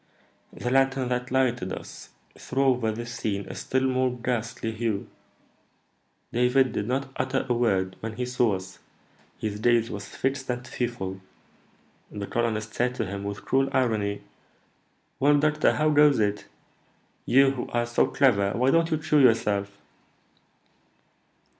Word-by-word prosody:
The 120 - -4
lantern 135 -1 +2
that 125 0 -2
lighted 125 -7 0
us - - -8 0.3
threw 135 +2 -2
over 125 -4 +2
this 115 +1 -6
scene 100 -3 -3
a - - -7
still 130 0 -1
more 130 -1 +1
ghastly 115 -2 -3
hue. 110 -2 -2 1.3
David 125 +2 +3
did 105 -1 -3
not 135 +2 -2
utter 130 +1 -1
a 125 - +2
word 95 -6 +1
when 110 0 -5
he 125 - -2
saw 125 -4 +1
us; 95 0 -9 0.6
his 105 -1 -4
gaze 115 0 +2
was 105 - -6
fixed 135 0 -3
and 125 0 -3
fearful. 105 -7 -4 0.9
The 100 -1 -5
colonist 110 -1 -2
said 125 +1 0
to 115 - -2
him, 100 +1 -5
with 100 0 -6
cruel 135 +1 +2
irony, 105 -5 0 1.0
'Well, 145 +2 +4
doctor, 150 +1 +2
how 155 0 +2
goes 150 -1 +5
it? 105 -1 0 0.8
You, 135 +2 +5
who 130 -2 -5
are 120 0 0
so 120 0 +2
clever, 100 -8 +2
why 125 +3 +2
don't 165 +1 +3
you 160 - +1
cure 150 -1 +2
yourself?' 100 -5 +2
120 Hz, 145 wpm, -26 LUFS, 105-130 Hz, 1.3 s, goes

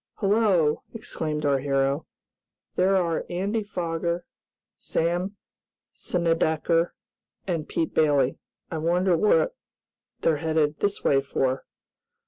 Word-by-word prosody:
"Hello!" 195 -7 +2
exclaimed 155 -8 -3
our 140 -1 +3
hero. 135 +2 0 0.7
"There 190 +2 +3
are 170 -3 0
Andy 200 +5 -1
Foger, 170 -3 -2 0.5
Sam 175 +4 -1 0.6
Snedecker 165 -1 +1 0.5
and 165 -5 -2
Pete 165 - -1
Bailey. 145 -4 +3 0.3
I 160 - -2
wonder 175 +3 +2
what 165 -3 +3 0.7
they're 160 -2 +3
heading 155 -1 +1
this 205 0 -1
way 135 -1 +4
for?" 135 -1 -1
165 Hz, 105 wpm, -26 LUFS, 150-180 Hz, 0.7 s, way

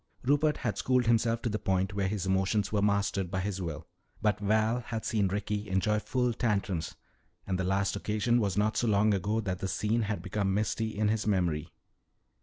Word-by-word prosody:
Rupert 145 +3 +2
had 115 - -2
schooled 125 -1 +2
himself 115 0 +2
to 120 - 0
the 105 0 -2
point 95 +1 0
where 100 -1 0
his 100 -1 -2
emotions 95 +2 +1
were 105 -2 +1
mastered 100 -2 +1
by 95 +1 -2
his 95 -1 -3
will. 80 -2 -5 0.3
But 105 -2 +1
Val 110 +3 +2
had 115 -2 -5
seen 105 -3 +1
Ricky 105 +2 -3
enjoy 105 +3 +1
full 125 0 0
tantrums, 100 -8 -1 0.5
and 95 -1 -2
the - - 0
last 95 +1 0
occasion 110 +4 +1
was 100 -2 -1
not 105 +1 +2
so 120 - +1
long 105 0 +3
ago 105 +4 0
that 95 -3 -3
the 95 - -2
scene 110 +4 0
had 105 -1 -2
become 100 -2 -1
misty 110 +1 -1
in 105 0 +2
his 110 0 0
memory. 85 -5 0
105 Hz, 200 wpm, -30 LUFS, 95-110 Hz, 0.5 s, long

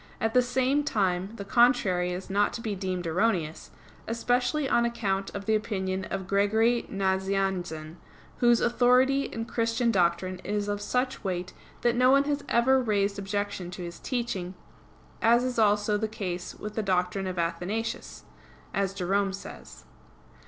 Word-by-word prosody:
At 225 0 0
the 250 - +6
same 260 +3 +1
time 190 -5 0
the 200 - -7
contrary 200 -6 +3
is 180 +1 -5
not 200 +1 +1
to 230 - -5
be 220 -3 -2
deemed 185 -2 -3
erroneous; 170 -2 0 0.4
especially 245 +5 0
on 235 - +3
account 200 -5 -1
of 200 0 -5
the 220 - +2
opinion 190 -3 -1
of 190 -1 -4
Gregory 220 +5 +2
Nazianzen, 190 -4 -1 0.4
"whose 240 -1 +4
authority 255 +3 +3
in 225 - -5
Christian 230 0 0
doctrine 180 -1 +1
is 205 +2 -2
of 205 0 -2
such 250 +5 -1
weight 185 -2 -3 0.3
that 240 0 +2
no 250 +1 +4
one 275 +1 +5
has 290 0 -2
ever 260 +3 +4
raised 200 -3 0
objection 200 -2 -3
to 180 0 -7
his 170 0 -7
teaching, 200 -8 -3 0.7
as 235 +2 +4
is 255 -2 -1
also 210 0 +3
the 220 - 0
case 185 -5 -5
with 210 0 -7
the 220 - -1
doctrine 190 -1 0
of 185 -1 -4
Athanasius," 175 +7 -3 0.5
as 195 -1 -1
Jerome 195 +1 0
says. 195 - -10
205 Hz, 155 wpm, -27 LUFS, 185-235 Hz, 0.7 s, the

